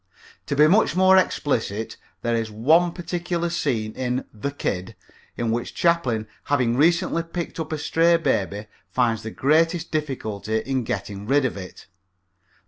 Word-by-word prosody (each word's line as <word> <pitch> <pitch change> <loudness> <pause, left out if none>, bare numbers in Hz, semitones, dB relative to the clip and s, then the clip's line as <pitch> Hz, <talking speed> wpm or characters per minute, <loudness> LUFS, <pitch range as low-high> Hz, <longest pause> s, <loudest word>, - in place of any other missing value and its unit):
To 140 - -1
be 150 +2 +6
much 190 +3 +4
more 190 +1 +6
explicit, 115 - 0 0.3
there 120 0 +1
is 115 -1 -1
one 155 +12 +3
particular 175 -1 -3
scene 115 -10 -1
in 125 0 -2
The 110 +6 -3
Kid 95 -9 -4 0.4
in 115 -2 -1
which 120 +1 -3
Chaplin 130 -11 +1 0.2
having 125 -5 +1
recently 170 +4 +2
picked 170 0 -6
up 160 -1 -4
a 155 - -1
stray 165 +3 +3
baby 105 - -1 0.2
finds 115 -3 +1
the 110 - -5
greatest 165 +7 +1
difficulty 110 -8 -2
in 130 +1 -2
getting 100 0 -4
rid 140 +1 +3
of 130 - -1
it. 95 -2 -9
135 Hz, 150 wpm, -23 LUFS, 110-165 Hz, 0.4 s, be